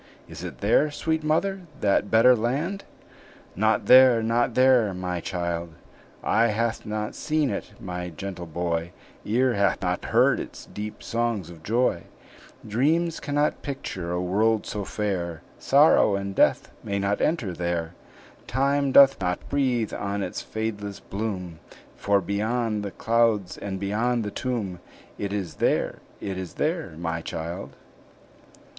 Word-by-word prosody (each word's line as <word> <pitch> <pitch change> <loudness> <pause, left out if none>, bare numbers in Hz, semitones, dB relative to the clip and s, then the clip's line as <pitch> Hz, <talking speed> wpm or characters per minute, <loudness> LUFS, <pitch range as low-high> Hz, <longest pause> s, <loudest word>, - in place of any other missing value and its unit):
Is - - -9
it - - -7
there, 115 +9 +3
sweet 160 +2 -2
mother, 180 +6 0 0.2
that 100 0 +2
better 120 +3 +6
land?" 145 - -2 0.7
"Not 110 +2 +2
there, 125 -1 +7
not 120 +1 +1
there, 125 -6 +4
my 90 -1 -3
child!" 85 -2 -3 0.5
"Eye 115 +2 +3
hath 115 +1 -1
not 105 0 -3
seen 155 -4 0
it, 100 - -5
my 90 -1 -5
gentle 90 +1 -7
boy; 85 +1 -2 0.3
Ear 125 +3 +2
hath 100 -1 +2
not 90 0 -1
heard - - +3
its - - -8
deep 105 +1 -7
songs 115 -7 -2
of 85 -2 -13
joy; 115 +9 0 0.6
Dreams 155 +10 +1
cannot 145 +1 0
picture 95 - -5
a 90 - -1
world 105 +5 +1
so 105 -1 -4
fair, 90 -6 -3 0.2
Sorrow 100 - +5
and 100 0 -3
death - - +2
may 100 - -2
not 100 +1 0
enter 135 - 0
there; 85 -1 -2 0.5
Time 140 +3 +1
doth 135 -4 +7
not 90 -1 -2
breathe 125 -6 0
on 100 0 -2
its - - -4
fadeless 105 -2 -4
bloom; 95 -5 -5 0.4
For 100 -1 +2
beyond 110 +3 -1
the 100 - -4
clouds 115 -1 +1
and 95 -1 -5
beyond 115 +4 0
the 105 - -4
tomb, 105 -9 -3 0.4
It 100 -1 -3
is 95 -5 -4
there, - - +1 0.2
it 95 -2 -4
is 90 -3 -7
there, 160 - -2
my 85 -1 -3
child!" 85 +4 -6
105 Hz, 145 wpm, -25 LUFS, 90-125 Hz, 0.7 s, there